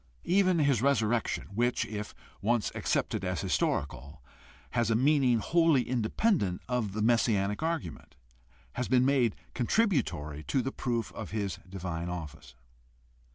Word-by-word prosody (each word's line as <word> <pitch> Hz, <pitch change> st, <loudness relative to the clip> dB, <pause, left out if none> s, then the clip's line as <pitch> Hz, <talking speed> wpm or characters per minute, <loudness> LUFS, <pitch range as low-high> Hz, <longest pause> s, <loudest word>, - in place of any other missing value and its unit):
Even 185 Hz, -1 st, +3 dB
his 140 Hz, -7 st, +2 dB
resurrection, 120 Hz, -4 st, +1 dB
which, 120 Hz, +3 st, +1 dB
if 105 Hz, -1 st, -6 dB, 0.3 s
once 115 Hz, +1 st, +1 dB
accepted -, -, -1 dB
as -, -, -2 dB
historical, 70 Hz, -1 st, -2 dB, 0.5 s
has 120 Hz, -2 st, +1 dB
a 115 Hz, -, +3 dB
meaning 130 Hz, -1 st, +3 dB
wholly 165 Hz, +2 st, +3 dB
independent 120 Hz, -, +1 dB
of 120 Hz, -5 st, -1 dB
the 105 Hz, +1 st, -1 dB
messianic 105 Hz, -3 st, +2 dB
argument, 160 Hz, -, -4 dB, 0.6 s
has 125 Hz, -, -2 dB
been 130 Hz, -1 st, +3 dB
made 130 Hz, -6 st, +2 dB, 0.2 s
contributory 115 Hz, -, 0 dB
to 130 Hz, -, 0 dB
the 135 Hz, -, -2 dB
proof 120 Hz, -5 st, -2 dB
of -, -, -7 dB
his 100 Hz, -3 st, -3 dB
divine 90 Hz, -3 st, -4 dB
office. 80 Hz, -7 st, -7 dB
120 Hz, 130 wpm, -30 LUFS, 100-135 Hz, 0.6 s, Even